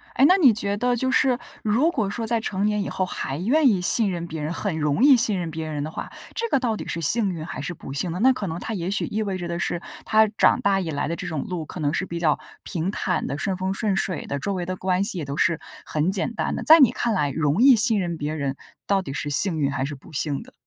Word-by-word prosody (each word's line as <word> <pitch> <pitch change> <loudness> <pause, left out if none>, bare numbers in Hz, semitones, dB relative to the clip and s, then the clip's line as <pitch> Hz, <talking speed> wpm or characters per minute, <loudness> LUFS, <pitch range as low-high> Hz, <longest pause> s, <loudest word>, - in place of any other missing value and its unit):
诶， 270 - +5
那 365 +6 +6
你 275 -10 +6
觉 200 -1 -1
得 245 +2 +1
就 260 +2 0
是 260 -2 +3 0.2
如 245 +11 +2
果 210 - -1
说 225 +2 -4
在 230 0 0
成 205 -2 -2
年 210 -1 +1
以 - - -3
后 185 - -1
还 135 -5 -4
愿 265 - +3
意 195 -6 +3
信 210 +3 +4
任 170 -2 -4
别 160 -2 -6
人， 155 +2 -3
很 180 -6 -2
容 150 - +1
易 280 -2 +8
信 220 -4 +2
任 170 -2 -4
别 160 0 -5
人 150 -2 -3
的 155 - -5
话， - - -6 0.2
这 465 0 -2
个 275 - +2
到 235 -3 -1
底 - - -7
是 170 - -3
幸 205 +6 +2
运 160 -2 -6
还 145 - -6
是 160 +5 -4
不 135 - -10
幸 170 +5 -1
呢？ 180 - -4
那 265 - +7
可 205 -6 -4
能 165 0 -4
他 225 - -5
也 180 -2 -3
许 200 - +1
意 215 +1 -3
味 195 -3 -2
着 175 - -5
的 170 0 -3
是， 170 - -2 0.2
他 220 0 +5
长 - - +4
大 195 -1 +2
以 175 - -3
来 145 -2 -2
的 170 - -2
这 - - -6
种 155 -4 -3
路 170 -4 -5
可 175 - -9
能 145 +1 0
是 190 - -1
比 170 - -6
较 160 -3 +1 0.2
平 175 -1 -2
坦 190 -2 -2
的、 140 - -3
顺 190 +4 -2
风 190 +1 -2
顺 200 -1 -1
水 185 -3 -2
的， 140 - -3
周 200 +8 -2
围 180 -2 -3
的 185 - -3
关 185 0 0
系 200 -2 +2
也 150 - -4
都 140 +1 -5
是 170 -3 +2 0.3
很 155 +4 0
简 200 +4 -1
单 - - -2
的。 - - -4
在 320 +1 +8
你 250 -4 +6
看 235 -2 -1
来， 150 -7 +1
容 150 - 0
易 265 0 +8
信 225 -2 +4
任 170 -2 -3
别 150 0 -3
人 140 -3 -2 0.3
到 195 -1 +2
底 135 - -6
是 145 - -3
幸 160 +2 +2
运 140 -1 +1
还 135 -2 -2
是 145 - -5
不 135 - -16
幸 145 0 0
的？ - - -15
185 Hz, 315 characters per minute, -23 LUFS, 160-220 Hz, 0.3 s, 易